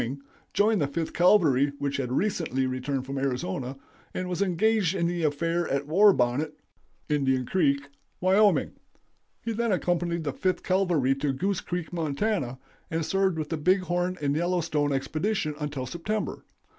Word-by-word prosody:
joined 210 -2 +3
the 145 - +2
Fifth 160 +3 -3
Cavalry, 150 -7 +4
which 140 -1 -2
had 125 -3 -2
recently 155 -5 0
returned 130 +1 -2
from 135 +1 -4
Arizona, 130 0 -2 0.4
and 185 - -2
was 180 +1 -2
engaged 200 0 +2
in 170 -3 0
the 175 0 -1
affair 165 +3 0
at 140 +1 -1
War 195 +8 +6
Bonnet 135 +2 0 0.5
(Indian 130 -3 +1
Creek), 140 -5 +1 0.3
Wyo. 195 +3 +3 0.7
He 230 - -2
then 230 0 0
accompanied 175 -2 0
the 145 -3 -2
Fifth 185 +6 -1
Cavalry 175 -8 +2
to 140 0 -1
Goose 190 +7 -1
Creek, 175 -1 -4
Mont., 155 -5 -2
and 165 - -3
served 190 0 +1
with 155 -2 -3
the 165 - -1
Big 185 +5 +3
Horn 180 0 -1
and 140 0 +1
Yellowstone 165 -3 0
expedition 155 +5 -1
until 145 -3 -3
September. 190 - -3
165 Hz, 155 wpm, -27 LUFS, 140-185 Hz, 0.7 s, War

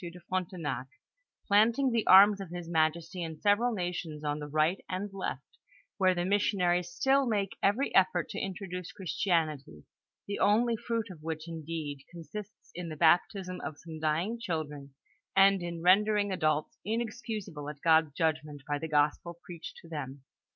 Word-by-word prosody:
de 175 0 -8
Frontenac, 170 -7 -3 0.6
plant 215 +4 +4
ing 270 -2 +2
the 230 -2 0
arms 200 +1 +8
of 190 - -7
his 175 -1 -6
majesty 165 +2 0
in 160 -2 -5
several 210 +6 +3
nations 175 -6 -4
on 145 0 -1
the 150 - -6
right 155 +5 +1
and 195 +2 -4
left, 195 - -6 0.4
where 185 -1 +4
the 175 0 -1
missionaries 180 -3 +1
still 270 +8 +2
make 205 -4 -1
every 230 +8 +1
effort 180 -3 +3
to - - -5
in 195 - -2
troduce 180 -2 -6
Christianity, 160 - -1 0.4
the 200 - -4
only 230 +4 +3
fruit 225 -2 -3
of 165 -4 -12
which 160 0 -5
indeed 160 -3 -5
consists 195 +5 -10
in 175 -1 -6
the 155 - -7
baptisiu 180 +3 +2
of 145 +1 -5
some 160 +1 -9
dying 165 +9 0
children, 150 -9 -5 0.4
and 195 0 +6
in 170 -1 -5
rendering 205 +2 +4
adults 155 -4 0
inexcusable 215 - -4
at 150 -1 -8
God's 160 -2 +4
judgment 155 -3 -1
by 145 0 -1
the 160 - -5
gospel 150 +3 +1
preached 170 -2 -9
to - - -13
them. 140 -4 -6
175 Hz, 165 wpm, -30 LUFS, 155-200 Hz, 0.6 s, arms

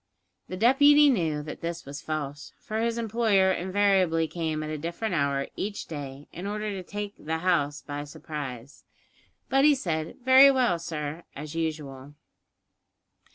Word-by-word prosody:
The 185 - -6
deputy 285 +6 +6
knew 160 - 0
that 150 - -8
this 170 0 -4
was 140 +1 -7
false, 145 -2 -5
for 220 0 -4
his 230 0 0
employer 220 -4 +2
invariably 185 -3 +2
came 160 -1 -3
at 155 - -5
a 155 - -3
different 170 +6 -3
hour 140 -3 0
each 205 +1 -4
day, 145 -2 -8
in 180 +4 -6
order 210 +1 -3
to 195 -2 -5
take 205 +2 -6
"the 160 +1 -2
house" 155 -5 0
by 145 0 -5
surprise; 145 -4 -8 0.6
but 270 0 +3
he 295 0 +6
said, 160 - -3
"Very 260 +1 +9
well, 250 -10 +2
sir," 155 -1 -5
as 150 +2 -7
usual. 145 -4 -4
165 Hz, 155 wpm, -27 LUFS, 150-205 Hz, 0.6 s, Very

